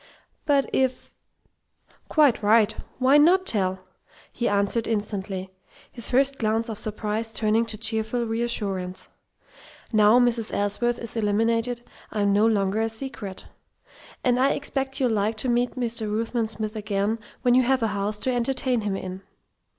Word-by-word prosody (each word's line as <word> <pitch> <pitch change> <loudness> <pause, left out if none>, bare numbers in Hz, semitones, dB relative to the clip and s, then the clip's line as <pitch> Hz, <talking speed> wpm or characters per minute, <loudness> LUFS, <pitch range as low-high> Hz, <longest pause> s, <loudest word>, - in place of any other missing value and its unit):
"But 280 -2 +3
if 260 -1 0 0.5
" - - -35
"Quite 295 -8 +4
right. 215 +1 +4 0.2
Why 265 +3 +5
not 365 +5 +5
tell?" 190 - 0 0.5
he 240 - -1
answered 205 +3 0
instantly, 195 -3 -3 0.4
his 235 -3 -1
first 275 +2 +2
glance 225 +1 0
of 215 - -5
surprise 215 +1 -3
turning 225 +1 +1
to 220 - -5
cheerful 225 +2 -1
reassurance. 205 -5 -3 0.8
"Now 215 +2 +6
Mrs. 240 -3 +1
Ellsworth 235 +4 0
is 230 -1 -1
eliminated, 230 +3 +1 0.3
I'm 205 -2 +1
no 210 +2 +4
longer 205 -1 +1
a 225 - 0
secret. 220 -5 -7 0.8
And 250 0 +2
I 270 +2 +3
expect 270 -1 -3
you'll 255 -3 +2
like 215 +1 0
to 250 - 0
meet 240 +1 +1
Mr. 230 -4 -3
Ruthven 225 +1 -1
Smith 215 0 -4
again 210 +1 -1 0.2
when 245 - +4
you 255 - +6
have 255 0 +1
a - - +3
house 205 +1 -2
to 255 - 0
entertain 250 0 0
him 205 -2 -2
in." 185 0 -6
225 Hz, 150 wpm, -25 LUFS, 210-245 Hz, 0.8 s, Now